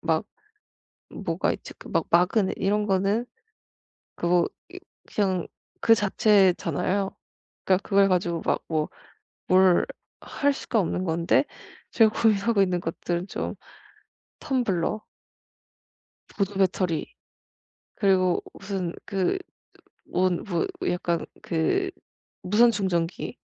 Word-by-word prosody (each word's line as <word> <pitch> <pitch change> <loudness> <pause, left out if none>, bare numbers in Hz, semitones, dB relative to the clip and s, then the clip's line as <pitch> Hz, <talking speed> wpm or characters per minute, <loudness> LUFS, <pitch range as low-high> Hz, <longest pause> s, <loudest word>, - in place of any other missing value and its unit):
막 - - 0 0.9
뭐가 - - -1
있지? - - -8
그 - - -13
막 - - 0
마그넷 185 +3 +3
이런 210 +2 +1
거는 200 +4 +1 0.9
그거 175 0 +2 0.2
이 365 +1 -9 0.3
그냥 190 -4 0 0.3
그 225 - +6
자체잖아요. 195 -2 +2 0.6
그니까 190 +1 +3
그걸 195 -1 +4
가지고 175 -2 0
막 - - +1
뭐 155 -2 -1 0.6
뭘 185 -1 +5 0.4
할 285 0 0
수가 235 -4 -1
없는 180 +1 -2
건데 170 - +2 0.5
제가 220 -2 +5
고민하고 215 -1 +3
있는 180 -2 +1
것들은 175 +2 -3
좀 - - -4 0.9
텀블러 215 - -1 1.3
보조 200 0 -1
배터리 185 -4 0 0.8
그리고 185 -3 +2
무슨 190 -3 -4
그 195 - 0 0.7
뭔 180 -1 0
뭐 175 -5 -1 0.2
약간 170 -2 -1 0.2
그 370 - 0 0.5
무선 210 +6 +5
충전기. 185 -5 -2
190 Hz, 200 characters per minute, -25 LUFS, 175-210 Hz, 1.3 s, 그